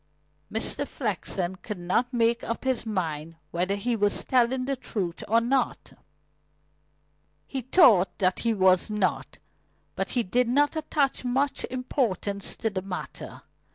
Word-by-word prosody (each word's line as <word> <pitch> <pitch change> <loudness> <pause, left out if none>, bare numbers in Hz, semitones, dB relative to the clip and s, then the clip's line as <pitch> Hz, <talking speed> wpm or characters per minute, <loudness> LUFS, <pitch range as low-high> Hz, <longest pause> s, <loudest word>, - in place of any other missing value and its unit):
Mr. 225 +6 0
Flexen 190 -5 -2
could 210 +1 -6
not 185 +8 0
make 235 -1 +2
up 230 - -4
his 260 -3 -1
mind 165 -6 -3 0.2
whether 185 +3 0
he 235 +4 -1
was 205 -2 +1
telling 255 0 +2
the 275 +1 -1
truth 185 -9 -4
or 230 +2 +4
not. 245 +2 -1 1.5
He 265 - -4
thought 240 - +5
that 185 -2 +1
he 230 - +1
was 185 -2 +3
not. 210 -3 -1 0.6
But - - -2
he 240 - +3
did 240 +6 +1
not 290 +5 +3
attach 295 -4 0
much 265 +3 0
importance 230 -6 -1
to 225 - -2
the 190 -2 -2
matter. 185 -1 -7
225 Hz, 140 wpm, -26 LUFS, 190-255 Hz, 1.5 s, thought